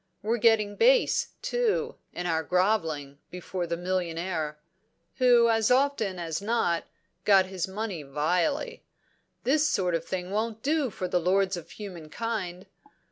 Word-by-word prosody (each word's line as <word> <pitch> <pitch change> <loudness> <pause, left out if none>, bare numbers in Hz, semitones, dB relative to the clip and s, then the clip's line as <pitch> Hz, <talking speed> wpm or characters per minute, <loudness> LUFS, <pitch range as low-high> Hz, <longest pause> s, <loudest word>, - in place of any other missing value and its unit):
We're 230 +3 0
getting 215 -3 +3
base, - - +4 0.2
too, 485 -3 0 0.2
in 175 - -5
our 165 -2 +1
grovelling 160 -6 0
before 180 0 -4
the 170 0 -2
millionaire 170 -3 -2 0.6
who 245 -2 +5
as 225 -1 +2
often 250 -7 +2
as 165 0 -3
not 205 -6 +1
has - - -36 0.3
got 195 -2 +5
his 185 -1 -3
money 195 -3 -4
vilely. 175 - -1 0.6
This 295 +3 +3
sort 180 -8 0
of 165 -1 0
thing 180 +1 -4
won't 220 +1 -2
do 295 -2 +1
for 185 -3 -4
'the 180 0 +1
lords 190 +2 +2
of 175 -3 -9
human 180 -7 -9
kind.' 190 -3 -4
190 Hz, 145 wpm, -27 LUFS, 175-230 Hz, 0.6 s, who